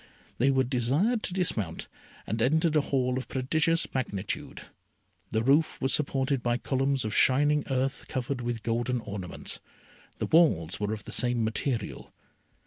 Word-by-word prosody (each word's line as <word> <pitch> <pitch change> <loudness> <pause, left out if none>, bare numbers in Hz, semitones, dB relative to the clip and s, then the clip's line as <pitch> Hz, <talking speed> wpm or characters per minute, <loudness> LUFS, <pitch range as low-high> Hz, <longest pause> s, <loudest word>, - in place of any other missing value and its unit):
They 130 +4 +4
were 135 -1 +3
desired 140 - +1
to 185 - -3
dismount, 110 - -1 0.4
and 110 +2 -2
entered 160 +6 +2
a 150 - +5
Hall 130 -2 0
of 130 - -8
prodigious 155 +5 +1
magnitude. 105 -7 -3 0.7
The 110 0 0
roof 145 +5 +3
was 135 - +1
supported 135 -2 +1
by 120 0 +1
columns 135 -1 0
of 110 - -2
shining 145 +4 +4
earth 135 0 -1
covered 130 0 -3
with 120 -2 -3
golden 120 +2 0
ornaments. 100 -4 -4 0.6
The - - -2
walls 150 - +3
were 105 0 -1
of 110 -1 -5
the - - -8
same 120 -2 +1
material. 110 0 -3
130 Hz, 150 wpm, -28 LUFS, 115-140 Hz, 0.7 s, a